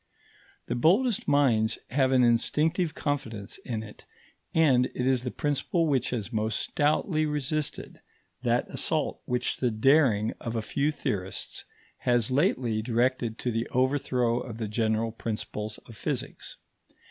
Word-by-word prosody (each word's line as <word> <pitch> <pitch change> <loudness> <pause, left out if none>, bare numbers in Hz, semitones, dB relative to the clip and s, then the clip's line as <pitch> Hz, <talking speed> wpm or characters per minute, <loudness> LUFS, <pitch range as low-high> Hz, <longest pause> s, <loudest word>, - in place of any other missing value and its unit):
The - - -2
boldest 195 - +2
minds 115 -6 +3
have 130 0 +2
an 130 -1 +5
instinctive 155 +8 +2
confidence 115 -9 -3
in 110 -3 -4
it, 105 -1 -13 0.4
and 135 -6 +4
it 125 - -1
is 130 -2 +2
the 125 - -3
principle 150 +5 0
which 135 -5 +1
has 120 -1 -4
most 110 0 0
stoutly 155 +2 +1
resisted 150 0 -3 0.4
that - - +1
assault - - -1
which 125 0 -1
the 125 - +1
daring 115 -2 +3
of 115 -1 -4
a 110 - -1
few 145 +6 0
theorists 105 -11 -4 0.3
has 120 -1 +1
lately 130 - +1
directed 120 0 0
to 125 - -2
the 115 +1 -1
overthrow 125 -2 +1
of 115 -3 -7
the 110 -2 -3
general 110 +1 0
principles 110 -1 -5
of 115 - -12
physics. - - -4
125 Hz, 140 wpm, -28 LUFS, 115-145 Hz, 0.4 s, an